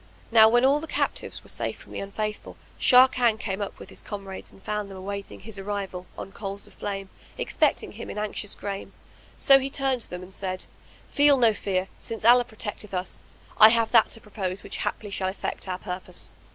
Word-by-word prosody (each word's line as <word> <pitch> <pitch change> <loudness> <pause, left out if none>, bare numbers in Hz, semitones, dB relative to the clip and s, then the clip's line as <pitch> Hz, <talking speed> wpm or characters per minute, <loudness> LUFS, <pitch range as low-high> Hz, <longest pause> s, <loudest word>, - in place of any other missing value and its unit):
Now 220 -1 +8
when 240 +2 +4
all 280 +2 +4
the 320 - -7
captives - - -2
were - - -13
safe - - -3
from - - -15
the - - -4
Unfaithful, 210 +2 -4 0.2
Sharrkan 250 -3 +6
came 195 -2 -3
up 200 - -4
with - - -11
his - - -8
comrades, 195 -2 -7
and 195 - -19
found 210 -1 -3
them 195 - -9
awaiting 200 +1 -6
his 205 -1 -8
arrival, 195 -2 -4
on 195 - -7
coals 200 0 -5
of - - -17
flame, 195 -1 -5 0.3
expecting - - +1
him - - -8
in - - -6
anxious 210 -1 -2
grame, 200 -1 -5 0.4
so 275 -1 +7
he 270 +1 -3
turned 270 -2 0
to - - -4
them; 180 0 -6
and 185 +1 -12
said, 185 -1 -3 0.5
"Feel 285 -1 +5
no 230 -3 +5
fear 190 -2 -1
since 225 -1 -6
Allah 245 +1 +7
protecteth 210 -3 -6
us. 180 0 -4 0.3
I 215 - +11
have 230 -1 +2
that 225 -2 +6
to 225 - -8
propose 195 -3 -4
which - - -5
haply 205 -2 -3
shall 190 -1 -1
effect 190 - -4
our 185 -1 -2
purpose." 185 -1 -5
205 Hz, 205 wpm, -26 LUFS, 195-230 Hz, 0.5 s, I